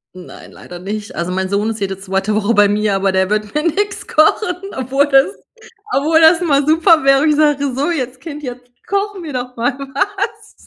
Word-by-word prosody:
Nein, 180 - -12
leider 175 0 -11
nicht. 205 +2 -6
Also 170 +2 -3
mein 190 0 -2
Sohn 205 +2 0
ist 225 -1 -4
jede 195 -1 -3
2. 195 +2 -2
Woche 215 +2 +1
bei 205 0 +5
mir, 205 -1 0
aber 195 0 +1
der 190 0 +1
wird 210 -1 -2
mir 300 - -1
nix 395 +4 -2
kochen, 350 +4 +2 0.2
obwohl 265 +2 +1
das 275 +8 +3 0.6
obwohl 315 +3 +3
das 320 +1 +6
mal 285 -5 +2
super 320 0 +4
wäre, 275 +2 +4
ich 300 - +3
sage: 290 -3 +1
„So, 285 +6 0
jetzt 260 -5 -4
Kind 300 -3 -8
jetzt 250 -2 -9 0.2
kochen 400 -2 -2
wir 300 -4 -7
doch 250 0 -5
mal 245 +3 -1
was.“ 385 +9 -4
270 Hz, 205 wpm, -17 LUFS, 210-315 Hz, 0.6 s, das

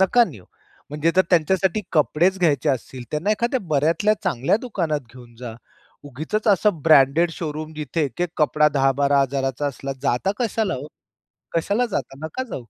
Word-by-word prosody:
नका 235 +6 +5
नेऊ. 95 -5 -13 0.5
म्हणजे 150 +3 +1
जर 185 - +6
त्यांच्यासाठी 190 +4 +2
कपडेच 170 +4 +2
घ्यायचे 150 -7 +2
असतील 130 -1 -4
त्यांना 155 +8 -1
एखाद्या 235 +4 0
बऱ्यातल्या 165 +9 +2
चांगल्या 140 - +1
दुकानात 170 - -2
घेऊन 120 -2 -14
जा. 120 -2 -7 0.5
उगीचच 155 - -3
असं 200 -4 +3
ब्रँडेड 155 +2 +5
शोरूम 155 -1 -5
जिथे 155 +1 -3
एक 135 +4 -6
एक 175 - 0
कपडा 150 -1 +3
10,000-12,000 135 -1 +1
चा 145 - -1
असला, 135 0 -4
जाता 125 +11 +1
कशाला 225 -3 -1
हो? 130 - -6 0.7
कशाला 205 +9 +1
जाता, 135 - -4
नका 260 +11 -4
जाऊ. 250 - -7
155 Hz, 155 wpm, -22 LUFS, 140-190 Hz, 0.7 s, जर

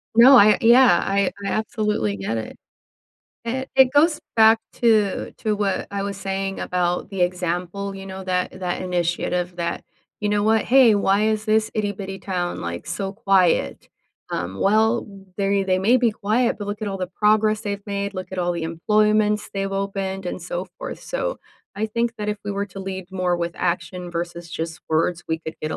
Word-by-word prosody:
No, 255 +4 +9
I 210 -2 +7
a - - -2
yeah, 240 -5 +6
I 195 0 +1
I - - -1
absolutely 210 - -1
get 110 +4 -3
it. 110 - -6 0.9
It 260 +3 -3
it 260 -1 +6
goes 300 +2 +4
back 225 0 +6 0.2
to 215 -4 +2
to 215 -2 0
what 200 -2 -1
I 200 0 -3
was 200 0 -4
saying 195 0 -3
about 180 +1 -1
the 195 -2 -5
example, 180 +2 -2
you 195 0 -8
know, 190 0 -7
that 180 0 -2
that 180 -1 -3
initiative 180 0 -1
that, 170 -1 -3 0.4
"You 210 - 0
know 205 0 +1
what, 220 0 +3
hey, 250 -3 +6
why 200 +1 +2
is 215 0 -1
this 215 0 +2
itty-bitty 205 -2 -3
town, 180 -2 -3
like, 85 0 -5
so 195 -1 -3
quiet?" 195 -5 +1 0.4
Um, 90 +3 -4
well, 220 +3 +2 0.3
they 200 0 +1
they 185 -1 +1
may 225 +7 +4
be 240 -2 +3
quiet, 225 +3 0
but 205 - -5
look 205 +1 -5
at 205 - -1
all 195 -1 -4
the 185 - -2
progress 215 +3 +2
they've 200 -2 -5
made, 200 0 -3
look 185 0 -6
at 185 - -5
all 175 0 0
the 170 -2 -3
employments 210 +5 +1
they've 195 0 -2
opened, 195 -1 -3
and 175 - -5
so 175 +1 -4
forth, - - -6
so, - - -3 0.4
I 220 - -1
think 230 +1 -2
that 210 -1 -4
if 210 0 -2
we 205 - -3
were 200 0 -2
to 195 0 -9
lead 190 -1 -6
more 180 -2 0
with 170 0 -3
action 175 0 -3
versus 170 0 -5
just 160 0 -5
words, 165 +2 +1
we 160 0 0
could 160 0 -7
get 155 - -2
a - - -3
195 Hz, 195 wpm, -22 LUFS, 180-215 Hz, 0.9 s, No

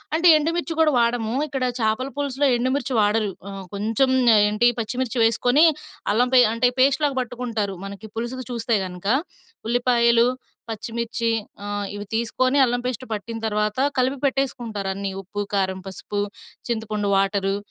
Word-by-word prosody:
అంటే, 335 +2 +3
ఎండుమిర్చి 330 +2 -1
కూడా 315 -1 +5
వాడము. 235 -1 +1
ఇక్కడ 270 -3 -3 0.2
చేపల 220 +3 0
పులుసులో 285 0 0
ఎండుమిర్చి 260 +2 -1
వాడరు. 210 0 +2 0.2
ఆహ్, 195 -1 -7
కొంచెం 225 +6 +1 0.4
ఏంటి 210 +3 +3
పచ్చిమిర్చి 250 +2 -3
వేసుకొని 245 +7 +4 0.5
అల్లం 245 +4 +2
పే 255 - +8
అంటే 230 +2 +3
పేస్ట్‌లాగా 275 +2 +3
పట్టుకుంటారు. 230 -5 -3
మనకి 200 +2 -8
పులుసుకి 240 +3 -4
చూస్తే 235 -1 0
కను, 180 -1 -7
క - - -1 0.6
ఉల్లిపాయలు, 235 -1 +3 0.4
పచ్చిమిర్చి 230 +1 -3 0.3
ఆహ్, 205 0 -3
ఇవి 205 0 -6
తీసుకొని 255 +4 +1
అల్లం 245 0 -1
పేస్ట్ 250 -1 -3
పట్టిన 215 +2 -5
తర్వాత 210 +2 -1 0.2
కలిపి 260 +2 +1
పెట్టేసుకుంటారు 240 -7 -2
అన్నీ. 195 0 -4
ఉప్పు, 200 +2 -8
కారం, 190 -1 0
పసుపు, 205 +2 -5 0.5
చింతపండు, 215 -3 -2
వాటరు 195 0 +1
230 Hz, 140 wpm, -23 LUFS, 210-255 Hz, 0.6 s, పే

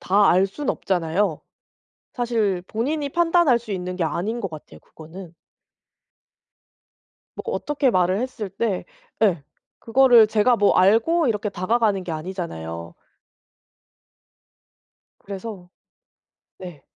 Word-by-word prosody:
다 200 +2 +3
알 185 +2 +4
순 280 +9 -7
없잖아요. 175 -1 -1 0.7
사실 220 -7 -1
본인이 285 +6 -2
판단할 340 -6 +3
수 230 -2 -13
있는 180 -1 -4
게 180 - -2
아닌 215 +9 -2
것 195 - -4
같아요 155 -2 -12
그거는. 165 +2 -12 2.1
뭐 - - -5
어떻게 290 -3 0
말을 185 +2 +2
했을 235 -5 -4
때 200 -3 -2 0.4
예 175 -9 +2 0.4
그거를 240 -1 +5
제가 220 +3 +3
뭐 205 - +3
알고 230 - +3
이렇게 210 -2 -1
다가가는 200 +1 0
게 170 - -5
아니잖아요. 85 - -6 2.3
그래서 195 -2 -8 0.9
네. 175 -6 -10
200 Hz, 225 characters per minute, -22 LUFS, 180-235 Hz, 2.3 s, 그거를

